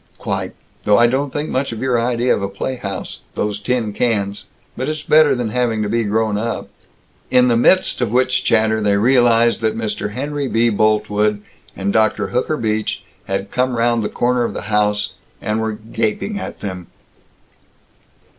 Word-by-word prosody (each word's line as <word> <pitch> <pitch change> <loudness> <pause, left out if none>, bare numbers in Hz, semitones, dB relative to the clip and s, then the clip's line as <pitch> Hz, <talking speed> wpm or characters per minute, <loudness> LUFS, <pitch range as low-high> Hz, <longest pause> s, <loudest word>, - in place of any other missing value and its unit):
"Quite! - - -3 0.3
Though 105 -1 +4
I 120 - +6
don't 135 +3 0
think 145 +3 -3
much 135 0 -1
of 115 - -6
your 125 -2 +1
idea 120 +1 +1
of - - -4
a 100 - -2
playhouse 100 -1 -5 0.2
those 105 -1 -2
tin 115 -1 -1
cans. 100 -4 -1 0.3
But 130 +4 -3
it's 155 -1 -4
better 155 -2 +5
than 120 -3 -2
having 115 -2 0
to 105 - -2
be 115 0 0
grown 105 0 0
up." 115 +2 -3 0.6
In 125 0 +4
the 120 - +3
midst 155 +5 +3
of 120 - +1
which 130 +1 +2
chatter 110 -1 +2
they 100 -1 +2
realized 120 0 +4
that 110 0 0
Mr. 105 -2 -3
Henry 145 +2 -3
B. 115 0 +2
Boltwood 105 -1 +1 0.3
and 100 +1 -2
Dr. 110 -1 +2
Hooker 130 +5 0
Beach 110 -3 -2 0.2
had 95 +1 -3
come 125 -1 0
round 120 0 +2
the 105 - -2
corner 125 0 +1
of - - -3
the - - -4
house, 105 0 +1 0.3
and 105 +2 -1
were 110 -1 -1
gaping 110 - -3
at - - -7
them. 95 -4 -6
115 Hz, 175 wpm, -19 LUFS, 105-125 Hz, 0.6 s, I